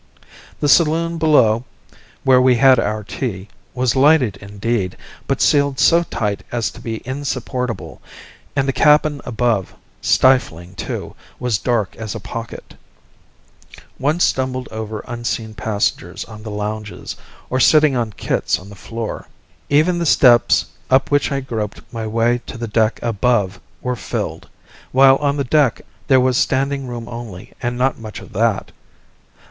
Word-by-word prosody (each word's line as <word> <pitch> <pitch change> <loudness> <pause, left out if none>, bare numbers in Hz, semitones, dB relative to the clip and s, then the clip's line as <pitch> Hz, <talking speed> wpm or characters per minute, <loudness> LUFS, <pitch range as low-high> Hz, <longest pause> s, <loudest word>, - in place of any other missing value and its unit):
The 145 - +1
saloon 165 +2 +3
below, 120 -8 +4 0.6
where 130 -1 +5
we 125 -1 +5
had 130 0 +6
our 105 +1 -1
tea, 100 -2 -5 0.3
was 125 -1 +1
lighted 135 -6 +4
indeed, 100 -1 -3 0.3
but - - -1
sealed 140 -2 +3
so 170 +1 +5
tight 105 - -3
as 120 -2 -1
to - - -13
be 115 -1 -5
insupportable; 130 -2 -4 0.5
and 135 -1 +1
the 135 - +1
cabin 150 0 +3
above, 115 -5 -1 0.3
stifling 95 -9 +2
too, 95 - -5 0.2
was 125 -5 -1
dark 115 -4 -1
as 110 -1 -5
a - - -4
pocket. 115 +3 -8 1.3
One 150 +5 +1
stumbled 130 -5 0
over 110 -1 -5
unseen 120 -2 -4
passengers 105 -1 -2
on 110 -1 -11
the 110 - -7
lounges, 105 0 -5 0.4
or 130 - +1
sitting 150 +1 +5
on 115 -3 -1
kits - - -1
on 95 +4 -13
the 100 - -11
floor. 115 +4 -6 0.4
Even 160 +5 +3
the 170 - 0
steps 120 -5 +5 0.2
up 130 +2 +3
which 145 0 +2
I 140 0 -1
groped 110 -5 -4
my 115 -1 -4
way 115 +2 +1
to - - -7
the 115 0 -4
deck 110 0 +1
above 105 -4 +1 0.2
were 125 0 -1
filled, - - -5 0.4
while 135 +1 +6
on 145 0 0
the 140 - 0
deck 135 -2 +2 0.3
there 130 -2 +5
was 130 -1 +2
standing 135 0 0
room 120 -1 -6
only 115 -6 -8
and 120 0 -2
not 130 +1 +1
much 110 -2 -8
of - - -13
that. 110 -1 0
120 Hz, 150 wpm, -19 LUFS, 110-135 Hz, 1.3 s, had